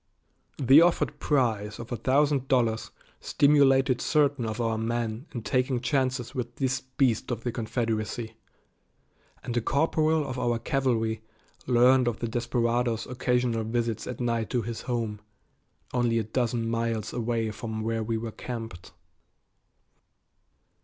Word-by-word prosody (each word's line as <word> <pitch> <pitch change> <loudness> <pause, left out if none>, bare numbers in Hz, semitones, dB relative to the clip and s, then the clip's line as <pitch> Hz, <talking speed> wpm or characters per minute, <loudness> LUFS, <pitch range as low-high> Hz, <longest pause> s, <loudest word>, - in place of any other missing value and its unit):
The 135 +3 +7
offered 175 0 +2
prize 110 -7 0
of 115 - -9
a - - 0
thousand 135 +3 +2
dollars 115 -4 +1 0.3
stimulated 135 -3 +3
certain 145 -6 +2
of 110 +1 -4
our 115 -1 0
men 115 +3 -2
in 120 -4 -6
taking 130 +1 +1
chances 130 0 -1
with 120 -2 -4
this 130 -1 -1
beast 130 -3 0
of 115 -2 -3
the 120 - -1
Confederacy, 115 -1 -2 1.1
and 120 - -4
a 120 - +2
corporal 155 +3 +1
of 130 - -4
our 120 -1 +1
cavalry 115 -4 0 0.5
learned 125 +1 +5
of 115 -2 0
the 120 - -3
desperado's 120 0 0
occasional 125 -2 0
visits 115 -1 -2
at 125 - -5
night 115 -3 -1
to 120 -2 0
his 115 -1 -5
home, 115 -4 -3 0.7
only 120 -2 +2
a 115 - +1
dozen 115 +1 -1
miles 115 -2 -2
away 115 -2 -1
from 110 0 -5
where 115 0 -1
we 110 +1 -1
were 115 0 -4
camped. 115 -7 -7
120 Hz, 140 wpm, -27 LUFS, 115-130 Hz, 1.1 s, The